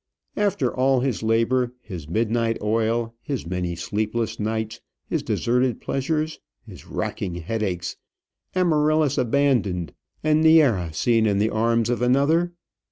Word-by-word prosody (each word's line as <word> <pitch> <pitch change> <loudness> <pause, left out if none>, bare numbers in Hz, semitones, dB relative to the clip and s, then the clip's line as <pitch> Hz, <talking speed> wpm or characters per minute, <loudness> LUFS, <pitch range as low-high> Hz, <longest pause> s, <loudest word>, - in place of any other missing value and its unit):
After 205 -1 0
all 130 0 +3
his 130 -4 -1
labour, 115 +3 +1
his 90 -10 -9
midnight 115 +3 0
oil, 115 +2 0
his 140 - -4
many 90 0 -2
sleepless 110 +5 -2
nights, 110 0 -3 0.2
his - - -1
deserted 125 +1 0
pleasures, 155 +3 -2 0.3
his - - -13
racking 90 - -3
headaches, 90 0 -3 0.6
Amaryllis 155 -4 +2
abandoned, 115 - +1 0.3
and 155 0 +3
Neæra 135 - +5
seen 115 +5 +2
in 100 -1 +2
the 110 +2 +1
arms 115 +1 +1
of 120 - -1
another 140 +8 +3
115 Hz, 125 wpm, -23 LUFS, 105-140 Hz, 0.6 s, Neæra